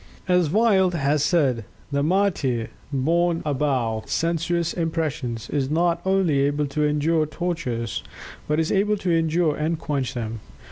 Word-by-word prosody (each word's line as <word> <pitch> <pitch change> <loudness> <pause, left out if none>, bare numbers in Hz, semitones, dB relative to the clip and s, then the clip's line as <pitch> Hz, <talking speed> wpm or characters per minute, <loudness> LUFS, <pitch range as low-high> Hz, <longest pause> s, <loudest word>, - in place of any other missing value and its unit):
As 180 -3 +3
Wyld 190 -2 +3
has 145 -1 +1
said, 140 - +2 0.3
"The 140 0 +1
martyr 155 - +1 0.2
borne 165 +5 +1
above 130 -6 -1
sensuous 170 0 0
impressions, 150 -9 -2
is 135 -3 0
not 170 +2 +1
only 190 -7 +2
able 145 +1 +1
to 145 +2 -1
endure 150 +1 +2
tortures, 150 -9 -3 0.5
but 150 +1 +1
is 160 - 0
able 210 +1 +2
to 185 -3 -1
endure 160 -1 +1
and 160 +2 -1
quench 135 -4 -2
them. 115 -1 -4
155 Hz, 140 wpm, -23 LUFS, 140-170 Hz, 0.5 s, As